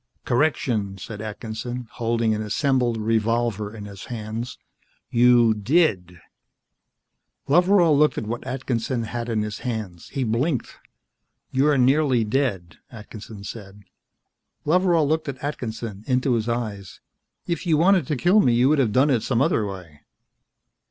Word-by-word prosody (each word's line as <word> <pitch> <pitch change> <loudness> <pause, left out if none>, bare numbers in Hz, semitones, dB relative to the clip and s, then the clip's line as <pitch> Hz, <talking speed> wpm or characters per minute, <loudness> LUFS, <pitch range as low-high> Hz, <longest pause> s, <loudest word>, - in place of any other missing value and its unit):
"Correction," 120 -7 0
said 105 +2 -8
Atkinson, 110 +3 -6
holding 115 -1 0
an 105 - -2
assembled 120 +2 0
revolver 110 -1 0
in 105 -2 -9
his 100 -1 -10
hands. 115 +1 -5 0.5
"You 120 -1 +5
did." 105 - +1 1.3
Loveral 175 +1 +4
looked 150 +1 +3
at - - -3
what 115 +2 -4
Atkinson 125 -2 -2
had 120 +2 -4
in 110 -2 0
his 105 0 -5
hands. 110 -8 -5
He 135 - -2
blinked. 125 +4 -1 0.7
"You're 140 +2 +3
nearly 130 -1 +3
dead," 105 -7 -2
Atkinson 110 -2 -10
said. 100 -1 -9 0.8
Loveral 170 -1 +3
looked 155 0 0
at 135 - -5
Atkinson, 115 -7 -5
into 130 0 +1
his 115 0 -1
eyes. 105 -5 -4 0.5
"If 170 +1 -3
you 160 -3 +3
wanted 185 +3 +3
to 150 - 0
kill 180 - +4
me, 125 - +4
you 125 +3 +4
could 150 -1 +3
have 120 -6 +2
done 135 +6 +3
it 120 -4 +2
some 120 0 0
other 135 - +1
way." 90 -7 -10
120 Hz, 140 wpm, -23 LUFS, 110-135 Hz, 1.3 s, You